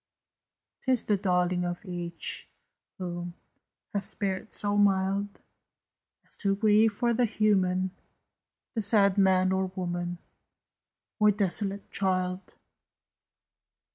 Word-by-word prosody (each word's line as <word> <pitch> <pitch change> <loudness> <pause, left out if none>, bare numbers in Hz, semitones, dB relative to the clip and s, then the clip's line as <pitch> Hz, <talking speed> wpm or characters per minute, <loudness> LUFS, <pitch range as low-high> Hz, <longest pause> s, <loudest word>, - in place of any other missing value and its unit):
'Tis 255 -3 +1
the 210 - +2
darling 180 -2 +1
of 175 +3 -4
each, 175 -2 -4 0.5
who 175 -1 -5 0.6
Has 200 -1 -1
spirit 195 +1 -3
so 205 0 +1
mild 200 0 +1 0.9
As - - -15
to 195 -2 +1
grieve 215 +1 +4
for 235 +3 0
the 245 +1 +2
Human 190 -4 +1 0.8
The 225 - -1
sad 200 -1 +4
man 185 -1 +4
or 190 0 +1
woman, 175 -1 -3 1.0
Or 210 0 +6
desolate 200 0 -1
child! 185 -1 -1
195 Hz, 105 wpm, -28 LUFS, 180-205 Hz, 1.0 s, Or